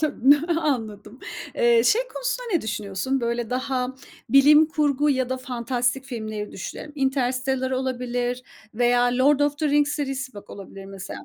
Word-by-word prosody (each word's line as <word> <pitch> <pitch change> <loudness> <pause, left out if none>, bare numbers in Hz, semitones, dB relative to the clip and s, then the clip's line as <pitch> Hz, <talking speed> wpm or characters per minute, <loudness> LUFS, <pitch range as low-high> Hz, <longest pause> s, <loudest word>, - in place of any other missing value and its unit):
Tabii, 280 -4 +2
n 290 - +9 0.2
anladım. 225 -7 -3 0.4
Eee, 235 -1 +4
şey 450 - +4
konusunda - - -3
ne 340 - +2
düşünüyorsun? 210 +5 -2
Böyle, 235 -1 -2
daha, 255 0 -2 0.3
bilim 290 +5 +6
kurgu 295 -2 +1
ya 260 -2 0
da 260 - -2
fantastik 250 0 -2
filmleri 215 -5 -5
düşünelim. 295 +10 -7
Interstellar 265 -1 0
olabilir 250 -1 -2 0.3
veya 245 +1 +3
The 245 - -2
Lord 285 +2 +4
of 290 0 +1
the 305 - 0
Rings 290 0 +2
serisi, 270 -4 -4
bak, 205 - -11
olabilir 195 0 -10
mesela. 195 0 -8
255 Hz, 155 wpm, -24 LUFS, 235-280 Hz, 0.4 s, n